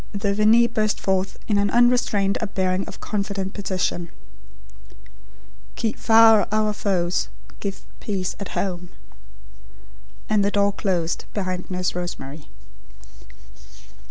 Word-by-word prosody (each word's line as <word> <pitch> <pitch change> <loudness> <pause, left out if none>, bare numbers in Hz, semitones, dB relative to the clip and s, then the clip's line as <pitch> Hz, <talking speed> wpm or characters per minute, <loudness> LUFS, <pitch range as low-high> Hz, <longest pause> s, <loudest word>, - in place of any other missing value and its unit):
'" - - -24
The 200 -1 +2
Veni 215 +3 +5
burst 215 -2 0
forth 190 0 -1
in 205 -2 +2
an 200 0 +2
unrestrained 235 -4 +3
upbearing 190 -3 -1
of - - -9
confident 200 -2 -3
petition: 185 -3 -2 1.7
"Keep 225 -2 -2
far 225 -2 +6
our 215 0 +1
foes; 180 -4 0 0.3
give 195 -1 -5
peace 190 -3 -3
at 200 - -6
home" 180 -2 -3 1.4
and 210 -2 +2
the 200 - +2
door 200 0 +2
closed 175 -5 -1
behind 185 -3 -3
Nurse 180 -1 -1
Rosemary. 155 -4 -6
200 Hz, 115 wpm, -23 LUFS, 185-215 Hz, 1.7 s, far